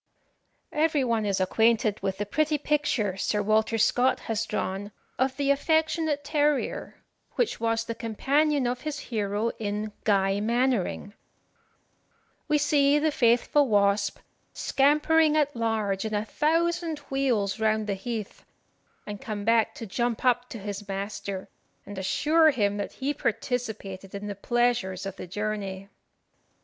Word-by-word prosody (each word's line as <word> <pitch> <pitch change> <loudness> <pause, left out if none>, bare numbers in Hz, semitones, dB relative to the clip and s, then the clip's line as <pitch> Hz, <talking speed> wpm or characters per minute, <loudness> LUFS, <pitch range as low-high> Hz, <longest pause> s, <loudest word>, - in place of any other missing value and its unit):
Every 305 -2 +2
one 230 -4 0
is 195 -1 0
acquainted 215 +2 +2
with 190 -1 -2
the 205 - -2
pretty 305 +7 +1
picture 280 -10 0
Sir 205 +1 0
Walter 220 +2 +2
Scott 245 +4 +2
has 225 0 -2
drawn 195 +2 -3 0.3
of 260 0 +1
the 280 -1 +2
affectionate 315 0 +1
terrier, 295 -1 -1 0.3
which 485 - 0
was 225 0 0
the 230 - -3
companion 275 +6 +1
of 245 +1 -2
his 305 -1 -4 0.2
hero 210 +1 0
in 210 0 -3
"Guy 195 -1 +2
Mannering." 230 -3 0 1.3
We 300 -1 +3
see 290 -1 +3
the 310 +1 +2
faithful 245 +3 +3
Wasp 200 -2 +2 0.4
"scampering 305 +2 +3
at 290 -2 +1
large 220 -4 -1
in 220 -1 -2
a 210 +1 -1
thousand 335 +3 0
wheels 240 -7 0
round 220 -1 +1
the 205 - -1
heath, 215 +1 -5 0.6
and 205 -1 -7
come 215 -5 -5
back 225 -1 +3
to 230 - -7
jump 235 +4 -2
up 245 0 +2
to 235 - -7
his 205 0 -6
master, 195 -1 -4 0.4
and 205 - -8
assure 310 - +3
him 205 -7 +1
that 205 - -4
he 280 +2 -2
participated 220 -7 -3
in 200 +1 -5
the 205 - -3
pleasures 215 -3 0
of 195 -1 -6
the - - -7
journey." 200 0 -4
225 Hz, 140 wpm, -27 LUFS, 205-280 Hz, 1.3 s, We